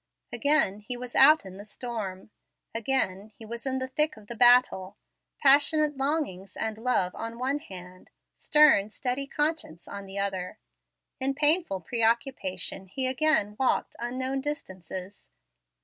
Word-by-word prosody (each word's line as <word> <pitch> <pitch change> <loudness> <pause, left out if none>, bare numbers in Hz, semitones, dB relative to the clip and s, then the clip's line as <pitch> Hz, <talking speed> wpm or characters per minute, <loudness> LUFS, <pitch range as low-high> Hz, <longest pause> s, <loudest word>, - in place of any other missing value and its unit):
Again 285 -9 +1
he 245 +4 -5
was 245 0 -8
out 300 -1 +7
in 190 0 -10
the 200 - -9
storm; 215 -3 -6 0.4
again 220 -4 -1
he 225 - -10
was 235 +4 -7
in 265 0 0
the 260 0 -3
thick 300 +1 -1
of 215 - -15
the 235 - -7
battle; 240 -5 +4 0.4
passionate 295 +2 +4
longings 270 - -3
and 220 -1 -3
love 225 -7 0
on 230 +1 -7
one 265 +4 -1
hand; 185 - -12 0.3
stern, 300 -10 +4
steady 255 +4 -3
conscience 295 - -3
on 200 -1 -8
the 195 +1 -8
other. 195 0 -3 0.6
In 270 +1 0
painful 300 - +3
pre 230 +8 -3
occupation 225 -5 -1
he 260 +8 -1
again 255 -5 +2
walked 265 - 0
unknown 260 +3 -3
distances. 190 - -7
240 Hz, 145 wpm, -27 LUFS, 195-275 Hz, 0.6 s, out